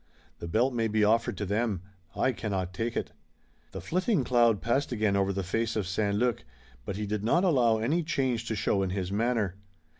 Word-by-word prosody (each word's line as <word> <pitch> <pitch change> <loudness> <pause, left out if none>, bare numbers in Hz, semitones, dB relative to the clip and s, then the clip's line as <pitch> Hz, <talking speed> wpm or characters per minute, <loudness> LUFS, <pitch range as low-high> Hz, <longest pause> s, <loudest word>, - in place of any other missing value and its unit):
The 85 - -6
belt 120 +9 +1
may 115 -2 +1
be 110 0 +1
offered 115 0 +2
to 105 - -2
them. 100 -2 -1 0.3
I 130 - +2
cannot 95 -6 -3
take 115 +4 -2
it." - - -3 0.6
The 95 - -6
flitting 185 - 0
cloud 120 -4 +3
passed 130 +6 0
again 105 -4 +1
over 100 0 +2
the 95 0 -2
face 115 +5 -1
of 105 -3 -1
St. 100 +2 0
Luc, 120 0 0 0.4
but 100 - -4
he 105 +1 -3
did 105 0 -3
not 170 - +3
allow 125 -11 +3
any 135 +11 +1
change 130 -7 -1
to 110 - -2
show 100 -1 +1
in 95 - 0
his 95 0 -3
manner. 105 -3 0
110 Hz, 205 wpm, -28 LUFS, 100-120 Hz, 0.6 s, cloud